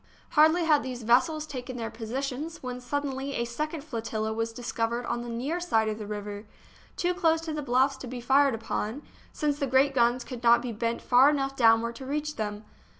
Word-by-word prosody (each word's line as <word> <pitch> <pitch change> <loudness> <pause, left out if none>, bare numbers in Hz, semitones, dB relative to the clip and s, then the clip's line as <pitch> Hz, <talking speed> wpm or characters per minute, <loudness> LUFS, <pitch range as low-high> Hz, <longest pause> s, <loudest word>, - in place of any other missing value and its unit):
Hardly 320 +3 +5
had 300 -2 +4
these 250 -2 -6
vessels 260 +7 +3
taken 255 -3 -6
their 225 -1 -4
positions 270 +8 -4
when, 250 0 -5
suddenly, 275 +1 -3
a 235 - 0
second 300 +5 -4
flotilla 220 -5 -3
was 225 +1 -2
discovered 235 0 -2
on 240 - -2
the 240 - -6
near 265 +9 -2
side 225 -11 +1
of 215 0 -4
the 210 - -6
river, 205 0 -6 0.5
too 355 0 +1
close 325 -3 +2
to 325 -1 -4
the 305 - -3
bluffs 265 +1 +2
to 265 - -8
be 250 0 -6
fired 270 +1 +3
upon, 225 +3 -3 0.3
since 295 -2 -1
the 280 - 0
great 265 +2 +3
guns 240 -1 +2
could 245 -1 -8
not 235 0 +6
be 245 - -3
bent 230 +1 -2
far 255 +3 +6
enough 275 -2 -1
downward 230 -1 +4
to 265 - -8
reach 300 +2 -2
them. 210 -1 -4
250 Hz, 205 wpm, -28 LUFS, 230-285 Hz, 0.5 s, not